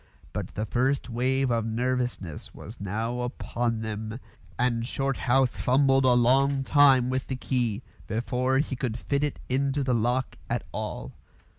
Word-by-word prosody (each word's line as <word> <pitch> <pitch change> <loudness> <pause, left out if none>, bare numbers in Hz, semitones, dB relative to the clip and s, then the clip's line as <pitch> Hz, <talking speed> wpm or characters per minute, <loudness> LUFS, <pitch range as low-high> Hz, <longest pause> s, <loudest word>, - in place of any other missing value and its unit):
But - - -5
the 105 - -1
first 130 +3 0
wave 130 +2 +1
of 115 -1 +1
nervousness 120 -7 -2
was 110 +3 -10
now 110 +5 -2
upon 120 -2 -2
them, 110 +1 -4 0.4
and 120 -2 +1
Shorthouse 135 0 +1
fumbled 135 +1 +4
a 125 - +6
long 135 +3 +3
time 135 -3 +5
with 130 0 -2
the 130 - -2
key 125 -5 -1 0.2
before 125 +4 0
he 140 -1 0
could 120 -3 -2
fit 140 +3 -1
it 150 - -1
into 135 +2 0
the 130 -1 +1
lock 120 +3 0
at - - -1
all. - - -5
125 Hz, 150 wpm, -27 LUFS, 115-135 Hz, 0.4 s, a